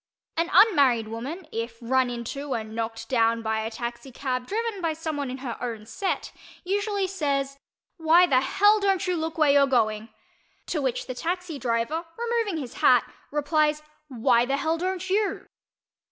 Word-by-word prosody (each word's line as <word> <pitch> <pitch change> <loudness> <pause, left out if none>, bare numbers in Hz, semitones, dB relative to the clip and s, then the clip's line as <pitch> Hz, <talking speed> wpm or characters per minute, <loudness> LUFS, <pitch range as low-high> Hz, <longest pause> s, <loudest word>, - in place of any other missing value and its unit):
An 335 +1 0
unmarried 265 - +5
woman, 280 +10 -6
if 230 +1 -4
run 255 +1 +1
into 250 +4 -4
and 220 -1 -5
knocked 225 0 -4
down 230 -2 +2
by 220 0 0
a 220 0 -2
taxicab 250 +2 -4
driven 445 -2 -2
by 330 -2 0
someone 310 -4 -3
in 255 - -5
her 235 - -3
own 225 -3 -4
"set," 370 - -3 0.3
usually 405 +1 0
says 280 -7 -2 0.4
"Why 330 +2 +6
the 260 -7 +3
hell 410 +10 +4
don't 390 -2 +1
you 365 -1 0
look 320 0 -3
where 305 -3 +5
you're 280 0 +5
going?" 220 -4 +1 0.6
to 310 - -2
which 260 -3 -1
the 255 - -5
taxi 345 +2 -3
driver, 235 +7 -1
removing 465 -6 -1
his 255 -4 -6
hat, - - +4 0.2
replies 300 +1 +1 0.2
"Why 240 -2 +3
the 270 +3 0
hell 320 +3 0
don't 370 0 -2
_you? 390 +2 -1
280 Hz, 165 wpm, -26 LUFS, 235-355 Hz, 0.6 s, Why